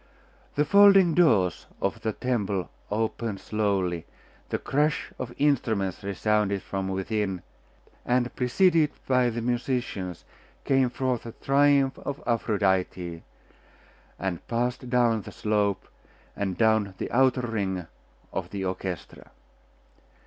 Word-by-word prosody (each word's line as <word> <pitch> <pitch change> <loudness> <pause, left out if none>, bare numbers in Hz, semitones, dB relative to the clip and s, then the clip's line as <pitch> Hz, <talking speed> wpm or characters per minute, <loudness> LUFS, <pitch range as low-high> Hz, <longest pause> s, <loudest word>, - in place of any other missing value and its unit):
The 150 - +2
folding 195 0 +7
doors 110 - +3
of - - -2
the 110 - -1
temple 105 -8 -2 0.2
opened 110 -1 -2
slowly, 95 -6 -1 0.4
the - - 0
crash 150 +1 0
of 125 -1 -4
instruments 110 -10 +1
resounded 100 0 0
from 95 -1 -3
within; 95 -1 -2 0.6
and, 125 0 0
preceded 160 +4 +3 0.2
by 125 -2 +3
the 115 0 -4
musicians, 120 -7 -2 0.4
came 135 -2 +3
forth 125 -1 -1
the 115 - -9
triumph 140 -1 +3
of 140 0 -5
Aphrodite, 95 -6 0 1.0
and 90 -3 -4
passed 120 +2 -2
down 120 -3 +3
the - - -10
slope, 105 -2 0 0.5
and 95 -3 -2
down 110 -4 +2
the - - -4
outer 130 +1 +3
ring 100 -7 -2 0.5
of - - -3
the 95 -2 -4
orchestra. 95 -4 -5
110 Hz, 115 wpm, -26 LUFS, 95-130 Hz, 1.0 s, folding